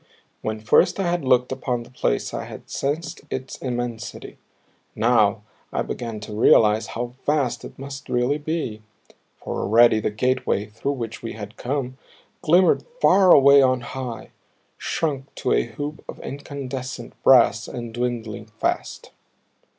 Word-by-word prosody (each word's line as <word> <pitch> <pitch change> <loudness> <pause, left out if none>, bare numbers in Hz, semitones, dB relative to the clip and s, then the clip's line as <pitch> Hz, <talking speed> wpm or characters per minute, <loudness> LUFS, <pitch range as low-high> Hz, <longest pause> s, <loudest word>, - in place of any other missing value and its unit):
When 110 0 -3
first 140 - +3
I - - +1
had 175 -2 -1
looked 125 -1 +3
upon 125 -2 -2
the 120 - -17
place 125 - -1
I - - -4
had - - -11
sensed 150 +3 -3
its 130 0 -5
immensity; 120 -3 -5 0.6
now 110 -3 +3 0.3
I - - -1
began 115 -3 -5
to 105 - -8
realize 110 0 +4
how 120 0 -3
vast 145 -4 0
it - - -10
must 140 +1 -8
really 125 +4 +1
be 150 -8 -3 0.6
for - - -4
already 115 +1 +5
the 110 - -1
gateway 125 -1 0
through 115 +7 -3
which 115 -4 -6
we 115 - -5
had 105 -1 -8
come 130 0 -3 0.4
glimmered 175 +3 +4 0.2
far 190 - +6
away 140 -1 +8
on 130 -1 +3
high, 125 -1 -6 0.5
shrunk 140 -4 -3
to - - 0
a - - +2
hoop 145 +6 -6
of - - -7
incandescent 135 -2 -6
brass - - +5
and 120 -2 -6
dwindling 115 -3 -3
fast. 105 -1 -3
125 Hz, 145 wpm, -23 LUFS, 115-140 Hz, 0.6 s, away